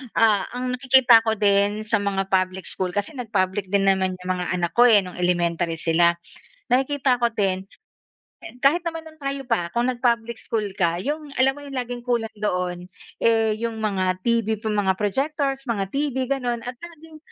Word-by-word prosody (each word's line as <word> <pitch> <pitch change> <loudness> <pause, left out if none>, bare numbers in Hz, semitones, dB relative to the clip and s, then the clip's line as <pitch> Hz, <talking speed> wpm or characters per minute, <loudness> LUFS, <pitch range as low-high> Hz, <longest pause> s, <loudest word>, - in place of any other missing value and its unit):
ah, 215 -3 +4
ang 250 0 -2
nakikita 250 -3 +6
ko 220 - +2
din 205 +1 +2
sa 225 - +2
mga 195 -1 -1
public 185 0 0
school 185 -1 -3
kasi 205 +8 -2
nag 245 -3 -6
public 190 +1 0
din 200 -1 +2
naman 190 -1 +1
yung 180 - -7
mga 180 - -2
anak 175 -2 -1
ko, 240 - +8
eh, 215 -3 +7
nung 180 - -9
elementary 175 -1 0
sila. 170 +1 +3 0.6
Nakikita 260 0 +2
ko 235 - +3
din, 190 -3 -1
k - - -23 0.9
kahit 315 +6 +4
naman 325 -1 -4
noon 315 0 -18
tayo 275 0 -3
pa 175 -8 0
kung 240 +1 +2
nag-public 235 -2 0
school 220 -2 -2
ka. 170 -3 +1
'Yong 295 +5 -4
alam 265 +1 +4
mo 290 - -10
'yong 275 -1 -8
laging 245 -1 -6
kulang 235 -3 -1
doon, 180 -3 -2 0.4
eh, 225 -1 +3
'yong 230 0 -3
mga 185 -3 -1
TV, 230 -1 +1
mga 205 -3 +1
projectors, 270 +5 -1
mga 200 -5 -1
TV, 275 -3 -1
gano'n. 245 -4 -1
At 250 0 -5
laging 325 -1 -12
225 Hz, 185 wpm, -23 LUFS, 190-255 Hz, 0.9 s, ko